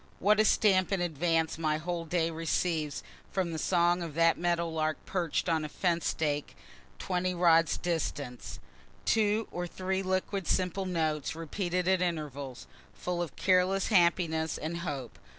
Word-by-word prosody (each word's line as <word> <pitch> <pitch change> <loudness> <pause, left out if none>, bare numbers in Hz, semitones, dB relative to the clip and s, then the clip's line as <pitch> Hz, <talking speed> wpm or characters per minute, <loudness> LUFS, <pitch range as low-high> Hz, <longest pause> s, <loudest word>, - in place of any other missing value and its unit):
What 210 +2 +3
a 215 - +5
stamp 190 -4 +3
in 195 - +1
advance 165 -1 0
my 155 -1 +1
whole 170 +1 -3
day 165 0 0
receives 160 -2 -1 0.3
from 185 -3 -1
the 160 - -3
song 175 +1 +2
of 165 -4 -5
that 165 0 +4
meadow 170 -1 0
lark 155 -1 -1
perch'd 175 -3 -1
on 160 -2 +1
a 150 - -4
fence 170 +1 0
stake 145 -2 -1 0.4
twenty 180 - -1
rods 165 -2 +4
distant! 145 -7 -3 0.5
Two 215 0 +2
or 175 0 -3
three 190 +2 -2
liquid 190 0 -1
simple 185 +1 0
notes, 160 -4 -1
repeated 175 +2 -2
at 190 -1 +3
intervals, 145 -7 -3 0.3
full 180 -1 -3
of 170 -5 -4
careless 185 +1 +2
happiness 170 -5 +2
and 160 +2 -4
hope. 145 -8 -5
170 Hz, 150 wpm, -30 LUFS, 160-185 Hz, 0.5 s, a